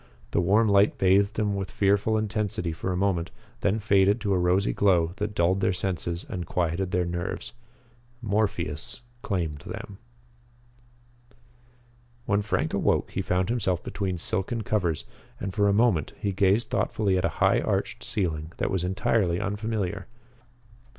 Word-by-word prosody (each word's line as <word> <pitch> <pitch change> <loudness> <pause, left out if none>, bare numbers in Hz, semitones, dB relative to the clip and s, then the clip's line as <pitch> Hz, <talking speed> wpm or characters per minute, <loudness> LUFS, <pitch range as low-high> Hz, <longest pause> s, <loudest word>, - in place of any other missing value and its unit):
The - - +2
warm 105 +6 +4
light 100 0 +4
bathed 100 +2 +3
them 105 -2 0
with 95 -1 -3
fearful 100 +2 +2
intensity 105 -5 -2
for 80 +3 -3
a 90 - -1
moment, 90 -3 0 0.3
then 105 -1 +1
faded 100 0 +3
to 100 -2 +1
a 90 - +2
rosy 90 +3 +2
glow 90 -4 +3
that 105 0 -3
dulled 90 +2 +2
their 95 - +2
senses 90 -1 -2
and 90 - -4
quieted 90 +2 -1
their 90 -1 +1
nerves. 85 +1 -4 0.7
Morpheus 110 +1 -2 0.2
claimed 85 -7 -2
them. 100 +7 -8 2.3
When 100 -2 +2
Frank 105 - -1
awoke - - +1
he 95 - -2
found 90 +1 0
himself 95 -7 0
between 95 -2 -3
silken 100 +7 -1
covers, 90 -7 0 0.3
and 95 - -4
for 100 +1 +2
a - - +4
moment 100 -7 +2
he 100 - -1
gazed 100 +4 +2
thoughtfully 100 -3 +1
at 90 - +1
a - - +2
high - - +4
arched - - -2
ceiling 80 -4 -2
that - - -1
was 95 -2 0
entirely 95 -1 +1
unfamiliar. 105 -2 -2
95 Hz, 150 wpm, -26 LUFS, 90-105 Hz, 2.3 s, warm